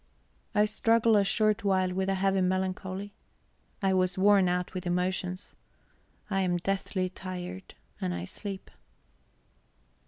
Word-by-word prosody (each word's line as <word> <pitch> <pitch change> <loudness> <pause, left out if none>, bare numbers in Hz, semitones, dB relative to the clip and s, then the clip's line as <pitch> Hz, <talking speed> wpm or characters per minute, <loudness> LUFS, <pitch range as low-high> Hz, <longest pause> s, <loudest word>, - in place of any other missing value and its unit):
I 210 0 +5
struggle 225 +1 +3
a 205 - +5
short 215 +2 +2
while 185 -2 +2
with 190 +1 0
a 195 - +2
heavy 195 0 +2
melancholy; 185 +2 -2 0.7
I 190 -1 +3
was 185 -1 +1
worn 195 -1 +5
out 180 0 -1
with 185 -1 -4
emotions; 180 +1 -2 0.7
I 195 -2 0
am 180 -2 +1
deathly 190 0 -1
tired, 180 - -7 0.3
and 90 - -1
I 85 0 -3
sleep. 195 - -7
190 Hz, 130 wpm, -29 LUFS, 180-200 Hz, 0.7 s, I